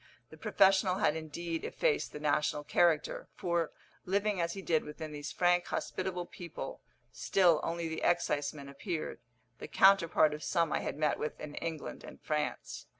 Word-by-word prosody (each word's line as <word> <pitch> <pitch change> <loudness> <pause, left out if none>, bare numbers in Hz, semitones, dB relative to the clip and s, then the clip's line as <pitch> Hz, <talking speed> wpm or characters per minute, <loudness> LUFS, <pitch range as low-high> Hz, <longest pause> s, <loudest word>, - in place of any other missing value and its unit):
The - - -10
professional 190 -1 +4
had 155 - +2
indeed 165 +1 -4
effaced - - 0
the 150 - -7
national 150 0 +1
character, 160 0 +2
for, 170 -2 0 0.3
living 200 0 0
as 170 0 -1
he 195 - -7
did 160 -3 +2
within 150 +1 -7
these 145 -1 -6
frank 175 0 +2
hospitable 180 -1 -3
people, 170 -2 -8 0.3
still 175 -5 +3
only 170 0 -2
the 160 - -4
exciseman 145 -4 0
appeared, 155 +4 -4 0.4
the - - -7
counterpart 170 -5 +5
of 150 - -6
some 165 -3 +1
I - - +1
had - - -4
met 150 -1 +1
with 150 - -4
in 150 -1 -7
England 165 -1 -5
and - - -11
France. 150 - -3
165 Hz, 160 wpm, -32 LUFS, 150-180 Hz, 0.4 s, counterpart